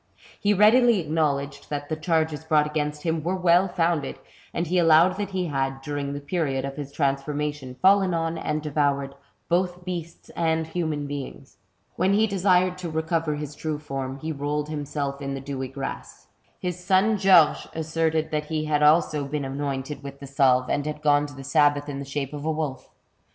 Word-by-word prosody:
He 205 - +2
readily 220 +2 +5
acknowledged 145 -3 -1
that 145 -1 -4
the 155 - -2
charges 160 -1 0
brought 155 -1 +3
against 150 -1 -3
him 160 -1 0
were 175 +4 -1
well 180 +1 +4
founded, 170 -5 0 0.3
and 170 - -2
he 180 +2 +1
allowed 165 +2 +5
that 205 -1 -3
he 190 -2 -2
had, 135 -3 -2
during 145 -1 -3
the 145 - -4
period 140 -3 -1
of 140 0 -5
his 145 -2 -6
transform 140 0 -1
ation, 145 -4 -4
fallen 195 -1 +5
on, 165 -1 -1
and 155 -1 -2
devoured, 140 -2 0 0.3
both 180 0 0
beasts 170 -2 -6
and 160 -1 0
human 160 -3 -2
beings. 140 -1 -7 0.4
When 190 +3 +2
he 215 +2 +4
desired 185 -2 +2
to 175 -2 -4
recover 160 -1 -1
his 150 -1 -6
true 155 0 -3
form, 135 -3 -5
he 155 +3 -4
rolled 145 +1 -2
himself 145 -2 -3
in 140 0 -3
the - - -4
dewy 135 -1 -4
grass. 135 +1 -7 0.3
His 180 0 -4
son 195 +4 +3
Georges 185 -6 +5
asserted 160 0 0
that 150 -1 -1
he 155 0 -2
had 150 -1 +1
also 150 -1 +4
been 145 0 -3
anointed 135 +1 -4
with 140 -1 -9
the 140 - -8
salve, 130 -2 +3
and 145 - 0
had 150 0 -5
gone 145 -1 +3
to 145 - -12
the 135 - -9
sabbath 145 0 +2
in 140 -2 -5
the 140 - -5
shape 140 0 -4
of 145 -1 -6
a 160 - 0
wolf. 150 -5 -4
150 Hz, 190 wpm, -25 LUFS, 140-170 Hz, 0.4 s, readily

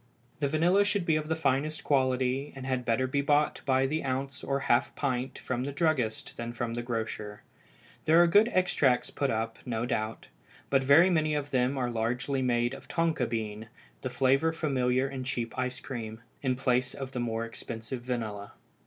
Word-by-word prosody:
The 145 - +1
vanilla 170 +7 +3
should 205 -3 0
be 160 - +3
of 155 0 -1
the 160 - 0
finest 150 0 0
quality, 130 0 +1
and 130 -1 -7
had 130 -2 -1
better 115 +2 +2
be 140 +2 0
bought 145 +1 +2
by 130 0 +3
the 155 +4 -1
ounce 135 0 -3
or 140 0 -1
half 120 -3 +2
pint 130 -2 -2
from 125 -1 -3
the 140 - -3
druggist 140 -7 -1
than 120 0 -4
from 120 0 -3
the 120 - -2
grocer. 110 -3 -4 0.6
There 160 +2 +6
are 175 - +8
good 205 +7 +5
extracts 150 -9 +2
put 140 - -1
up, 115 0 -2
no 120 -1 -2
doubt, 110 -3 -2 0.5
but 135 -1 +4
very 160 +7 +6
many 155 -3 +2
of 145 -1 -3
them 130 +1 +1
are 125 -2 -1
largely 125 +4 -1
made 120 -1 +1
of - - -10
tonka 165 -7 0
bean, 110 -1 -4 0.3
the 130 - -3
flavor 135 +5 +3
familiar 130 -5 +1
in 135 -1 -5
cheap 120 -2 -3
ice 130 0 -2
cream, 115 -4 -6 0.2
in 130 -2 +1
place 125 -1 +1
of 135 -1 -6
the 125 - -4
more 115 -1 -1
expensive 115 +2 -6
vanilla. 110 -5 -4
130 Hz, 190 wpm, -29 LUFS, 120-145 Hz, 0.6 s, are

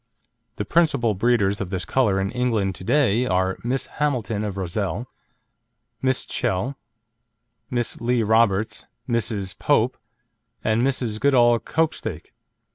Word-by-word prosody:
The - - -3
principal 140 -9 +2
breeders 105 -1 +1
of 95 - -3
this 90 -3 -2
colour 105 -3 +2
in 95 +1 -1
England 115 -6 0
to 90 - -10
day 125 0 +2
are 95 -2 0
Miss 125 +3 -1
Hamilton 120 -8 -1
of 100 -2 -4
Rozelle, 100 +4 -2 1.0
Miss 130 -1 0
Chell, 115 +10 -1 0.9
Miss 120 -3 -2
Lee 120 0 +1
Roberts, 110 -1 +2 0.2
Mrs. 105 -5 -1
Pope, 130 -3 +2 0.7
and 110 +1 +2
Mrs. 125 -4 0
Goodall 120 -4 +4
Copestake. 155 - -2
115 Hz, 120 wpm, -23 LUFS, 100-125 Hz, 1.0 s, Goodall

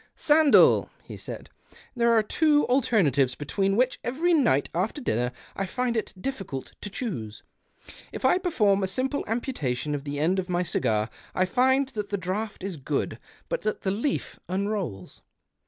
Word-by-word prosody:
" - - -48
Sandell," 300 -1 +5
he - - -9
said, - - -8 0.2
" - - -23
there 235 -1 +3
are 225 -2 +4
tw^o 295 +6 +3
alter 245 -5 +3
natives 135 -3 +2
between 195 +7 0
which 255 +3 +1
every 320 +9 +1
night 240 - +3
after 190 - -1
dinner 125 - 0 0.2
I 195 - -2
find 250 +3 -1
it 220 - -2
difficult 195 - -5
to 205 - -4
choose. 155 - -5 0.7
If - - -5
I 360 - +4
perform 210 - +2
a 190 - 0
simple 260 +8 -1
amputation 155 - -2
of 145 -1 -3
the 145 0 -4
end 175 +5 +2
of 185 0 -4
my 175 0 +1
cigar 110 -10 0 0.3
I 185 - +3
find 260 +6 +2
that 210 -5 -5
the 200 - -1
draught 200 +4 -4
is 190 -4 -4
good 140 +1 -2 0.3
but - - -2
that 215 - -2
the 190 - 0
leaf 230 +8 -2
unrolls. 190 - -3
200 Hz, 175 wpm, -26 LUFS, 160-255 Hz, 0.7 s, Sandell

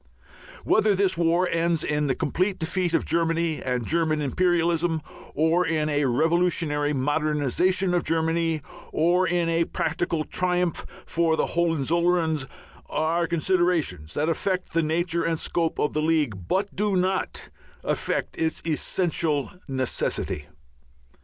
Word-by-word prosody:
Whether 215 -1 +3
this 190 -1 +2
war 170 +2 +2
ends 165 -1 +1
in 150 0 0
the 130 - +1
complete 185 +5 -1
defeat 175 +1 -1
of - - +1
Germany 165 -1 0
and 125 -2 -2
German 160 -2 +1
imperialism, 170 +2 +1 0.4
or 160 +4 +3
in 155 -2 0
a 145 -1 +1
revolutionary 155 +1 +1
modernization 150 +6 +1
of 175 - +1
Germany, 165 -1 0 0.3
or 175 +3 +2
in 175 -1 +1
a 165 0 +2
practical 160 0 -1
triumph 180 0 -1 0.2
for 165 -1 +1
the - - +2
Hohenzollerns, 165 -2 +1 0.4
are 165 +3 0
considerations 170 - 0
that 150 +2 0
affect 180 +2 -1
the 165 - +3
nature 170 +2 0
and 165 -1 0
scope 165 -2 -1
of 150 - 0
the 155 - 0
League, 145 - 0
but 200 - -1
do 205 0 0
not 185 +1 -1 0.3
affect - - -2
its 160 0 -1
essential 160 -2 0 0.2
necessity. 130 - -2
165 Hz, 130 wpm, -25 LUFS, 155-175 Hz, 0.4 s, Whether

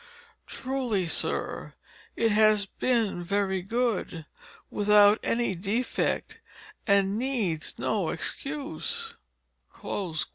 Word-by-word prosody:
"Truly, 255 -8 -2
Sir, - - +1 0.4
it 230 -1 +2
has 215 -1 +4
been 220 -4 -1
very 190 0 0
good, 205 -6 -2 0.5
without 210 +1 +5
any 235 -4 0
defect, 205 +7 -2 0.5
and 200 0 +3
needs 230 - -2
no - - -1
excuse." 310 +11 -4
210 Hz, 80 wpm, -27 LUFS, 195-245 Hz, 0.5 s, without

